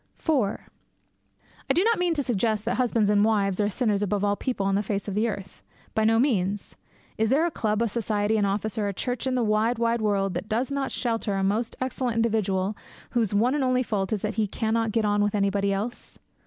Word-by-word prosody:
IV 320 - -1 1.4
I - - +5
do 360 - +4
not 455 -1 +2
mean 350 -2 +1
to 285 - 0
suggest 220 -3 0
that 235 - 0
husbands 230 -4 +2
and 205 0 +4
wives 205 -3 +2
are 205 - +1
sinners 210 -2 0
above 205 0 0
all 205 0 +2
people 225 -3 -2
on 195 - +1
the 200 - +2
face 200 -1 -3
of 200 - -3
the 215 +4 +1
earth. 195 -4 -6 0.3
By 220 - +1
no 225 +1 +4
means. 205 -6 0 0.4
Is 220 0 +2
there 290 +6 +3
a 345 - -1
club, 215 -4 0
a - - +1
society, 215 -1 0
an 210 - +2
office, 210 +2 -1
or 205 - 0
a 200 - -3
church 245 +3 -2
in 260 - 0
the 245 - +1
wide, 220 +2 +1
wide 235 0 +1
world 200 -3 +1
that 180 +4 -5
does 245 +5 0
not 280 -1 -2
shelter 225 -4 -1
a 195 - 0
most 215 +4 0
excellent 255 -2 -2
individual 210 -3 0 0.4
whose 225 -5 0
one 240 +6 +3
and 290 -2 0
only 255 0 +2
fault 200 -4 -2
is 210 -3 -1
that - - -1
he 210 - +1
cannot 225 +2 -1
get 225 0 +1
on 205 0 +2
with 205 0 +1
anybody 200 0 +1
else? 210 +5 -4
215 Hz, 230 wpm, -26 LUFS, 205-240 Hz, 1.4 s, I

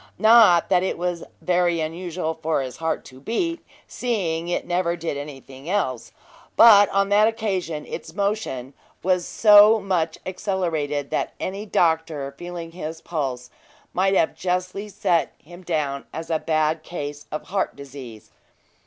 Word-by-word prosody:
Not 220 -6 +6
that 180 -2 +4
it 190 - -2
was 175 -1 -2 0.2
very 175 -1 +2
unusual 165 +1 -3
for 160 -3 -1
his 130 -1 -7
heart 160 0 -2
to 130 0 -13
beat, 335 - -2 0.2
seeing 175 -9 -2
it 175 - -2
never 175 -1 0
did 165 -3 -4
anything 140 0 -9
else; 130 - -1 0.5
but 205 -3 +8
on 195 0 +1
that 210 +1 +5
occasion 190 -9 -2
its - - -8
motion 200 - -2 0.3
was 180 -1 +1
so 210 +1 +7
much 170 -5 -1
accelerated, 165 -7 -2
that - - -1
any 200 +3 -4
doctor 160 -6 0
feeling 175 0 -7
his 160 -2 -6
pulse 135 -8 -4 0.4
might 195 +2 +2
have 160 - +2
justly 185 +3 -2
set 170 -5 0
him 175 +4 -14
down 150 -6 -2
as 160 +1 -6
a 160 - +1
bad 155 0 0
case 145 -3 -7
of 155 - -6
heart 195 0 -1
disease. 135 -6 -11
170 Hz, 145 wpm, -23 LUFS, 155-190 Hz, 0.5 s, but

